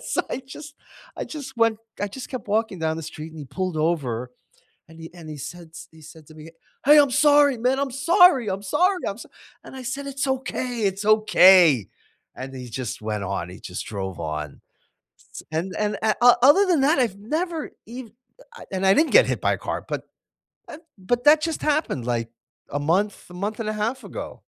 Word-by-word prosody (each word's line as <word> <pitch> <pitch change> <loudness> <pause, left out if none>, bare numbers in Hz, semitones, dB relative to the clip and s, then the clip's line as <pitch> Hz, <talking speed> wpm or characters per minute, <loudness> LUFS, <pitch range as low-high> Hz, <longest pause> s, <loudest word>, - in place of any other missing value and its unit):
So, - - -1
I 265 - -4
just 290 +2 -10 0.4
I - - -4
just 275 -5 -8
went 230 -2 +2 0.2
I 205 - -1
just 250 +6 -9
kept 255 -5 -7
walking 215 -2 0
down 160 -1 -1
the 165 - -6
street 155 +1 -8
and 160 - -11
he 150 - -7
pulled 185 +4 -4
over 135 -7 -1 0.6
and 160 0 -15
he 165 +1 -10
and 170 -3 -11
he 150 - -7
said 170 +4 -9
s 165 - -12
he 160 0 -18
said 155 0 -14
to 155 - -15
me, 155 +1 -12 0.3
"Hey, 295 +3 +7
I'm 285 -2 +5
sorry, 290 -1 +4
man. 250 +3 +1
I'm 280 -1 -1
sorry, 285 - +4
I'm 195 +1 -3
sorry, 360 - +1
I'm 200 - -6
so" - - -11 0.4
And, - - -12
I 260 - -7
said, 275 +3 -5
"It's 275 0 -3
okay, 255 -2 -3
it's 195 +2 -8
okay!" 185 - +6 0.5
And 135 +1 -7
he 125 -1 -8
just 125 0 -5
went 105 -2 -3
on. 90 -2 -3
He 90 - -11
just 90 - -7
drove 95 -3 -5
on. 75 -2 -5 0.7
S - - -9
and 170 +4 -3
and 210 0 0
a 220 -1 +2
o 245 0 +7
other 305 +9 +6
than 345 -7 +2
that, 285 +1 +3
I've 225 -6 0
never 315 - -3 0.2
ev 245 +1 -8 0.3
uh - - -15
I - - -11
and 190 0 -2
I 190 - +6
didn't 315 +1 +2
get - - +7
hit - - -1
by - - +2
a - - -3
car, - - -4
but, - - -3 0.7
eh 290 - -9 0.2
but 240 +6 -2
that 300 +1 +7
just 325 -1 -2
happened, 295 - -1
like, 115 -1 -2 0.4
a 145 - -2
month 190 +7 -1
a - - -11
month 205 +4 -4
and 215 - -3
a - - -1
half 225 +5 -3
ago. - - -8
210 Hz, 215 wpm, -23 LUFS, -, 0.7 s, Hey